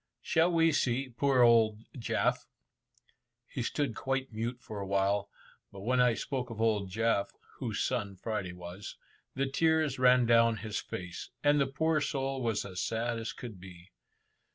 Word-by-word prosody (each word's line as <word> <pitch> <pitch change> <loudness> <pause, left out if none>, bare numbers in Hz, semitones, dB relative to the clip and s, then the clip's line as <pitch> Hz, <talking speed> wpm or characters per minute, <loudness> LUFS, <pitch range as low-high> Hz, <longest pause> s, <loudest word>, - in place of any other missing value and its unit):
Shall 165 +2 +3
we 165 -1 +4
see 130 -2 0
poor 130 +1 +3
old 115 -2 +4
Jaf?" 120 - 0 1.0
He 130 - -5
stood 135 +1 -1
quite 135 +2 -2
mute 115 +3 -3
for 105 -2 -7
a 100 - -4
while, 100 +1 +1 0.4
but 100 - -10
when 125 +4 +2
I 125 -2 +4
spoke 125 +3 -3
of 115 -2 -7
old 105 -4 +1
Jaf 110 0 +1 0.3
(whose - - -2
son 100 -1 -2
Friday 95 -2 -4
was), 90 +3 -9 0.4
the 135 +1 +1
tears 155 -1 +1
ran 125 -1 +5
down 115 -1 +4
his 110 -2 -4
face, 90 -1 -7
and 145 0 +4
the 135 - +2
poor 155 +3 +1
soul 135 -2 -2
was 115 -4 -1
as 95 -2 -5
sad 115 +1 -1
as 115 - -4
could 115 -6 -9
be. 90 -1 -13
115 Hz, 165 wpm, -31 LUFS, 105-135 Hz, 1.0 s, ran